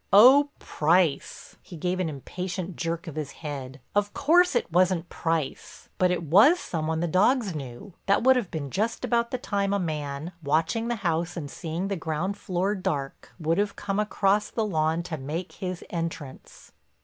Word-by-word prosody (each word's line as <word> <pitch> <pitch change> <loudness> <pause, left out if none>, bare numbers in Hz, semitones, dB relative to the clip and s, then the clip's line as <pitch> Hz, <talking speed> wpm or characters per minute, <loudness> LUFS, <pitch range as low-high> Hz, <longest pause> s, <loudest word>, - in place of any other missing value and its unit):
"Oh, 265 +8 +8
Price—" 160 -1 0
he 175 - -11
gave 180 +3 -1
an 180 -3 0
impatient 180 +5 -5
jerk 165 0 -3
of 160 - -7
his 150 -2 -5
head—"of 145 +7 -4
course 325 +3 +4
it 235 - 0
wasn't 180 0 +2
Price, 165 -4 -3
but 185 - +4
it 180 -1 -1
was 205 - +6
some 160 - -3
one 160 0 -1
the 175 - +1
dogs 200 - +2
knew. 140 +6 -8
That 200 +3 +3
would 260 +1 +6
have 235 -8 -1
been 140 -4 -5
just 220 +4 -1
about 235 -1 +1
the 255 - -2
time 200 -4 -1
a 200 - +1
man, 150 -2 -3
watching 160 +10 0
the 240 - 0
house 170 +1 0
and 145 -4 -5
seeing 170 +4 -4
the 200 - -1
ground 165 +3 -2
floor 190 +1 -1
dark, 180 -9 -4
would 165 +3 +1
have 205 -1 0
come 200 0 -2
across 210 0 +1
the 225 - -1
lawn 160 -3 0
to 165 -4 -5
make 160 +7 -4
his 185 -2 -5
entrance." 165 -5 -6
175 Hz, 180 wpm, -26 LUFS, 160-200 Hz, -, Oh